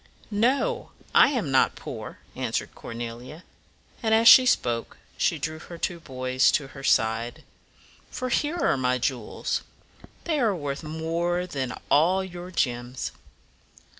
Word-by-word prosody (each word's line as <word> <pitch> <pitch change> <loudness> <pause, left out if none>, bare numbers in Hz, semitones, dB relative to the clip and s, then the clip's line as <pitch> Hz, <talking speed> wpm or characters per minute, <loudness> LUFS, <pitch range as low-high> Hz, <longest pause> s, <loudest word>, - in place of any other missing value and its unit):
"No, 265 - +1 0.2
I - - +7
am 235 - -1
not 130 - +3
poor," - - -8 0.2
answered - - -2
Cornelia, 120 +7 -8 0.6
and 220 -2 +3
as 225 +1 +4
she 255 +1 +10
spoke 120 - 0 0.2
she - - +1
drew 155 0 -4
her 170 +1 -10
two 170 +1 -2
boys 130 -3 +1
to 135 -3 0
her 135 -1 -11
side; 115 -1 +1 0.7
"for 255 - -4
here 295 +7 0
are 235 - +2
my 125 -1 +1
jewels. 125 -2 -2 0.6
They 315 -3 0
are 220 -6 +2
worth 145 -4 -4
more 165 +3 -2
than 135 -7 -4 0.2
all 175 +6 +4
your 180 -1 -8
gems." 125 -6 -2
160 Hz, 135 wpm, -26 LUFS, 130-190 Hz, 0.7 s, she